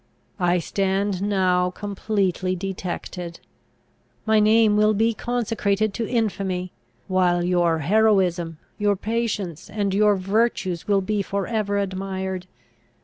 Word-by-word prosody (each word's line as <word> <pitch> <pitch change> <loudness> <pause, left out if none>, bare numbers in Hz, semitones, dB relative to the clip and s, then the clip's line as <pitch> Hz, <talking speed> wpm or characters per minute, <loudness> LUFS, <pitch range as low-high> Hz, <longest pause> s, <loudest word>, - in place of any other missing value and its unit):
I 175 0 +3
stand 195 +2 -1
now 185 -3 +2
completely 195 -2 -1
detected. 180 -2 -5 0.9
My 220 -1 +4
name 215 0 +4
will 215 0 +4
be 225 +2 +2
consecrated 215 -3 -1
to 230 0 -3
infamy, 190 -6 -1 0.4
while 180 -2 +2
your 175 -2 +2
heroism, 185 -4 +2 0.2
your 205 -1 +2
patience, 205 -5 -3
and 200 -2 -1
your 210 +1 +4
virtues 195 -2 0
will 200 -1 +3
be 205 +2 -1
for 200 0 -2
ever 210 -3 -1
admired. 190 -1 -3
195 Hz, 115 wpm, -23 LUFS, 185-215 Hz, 0.9 s, My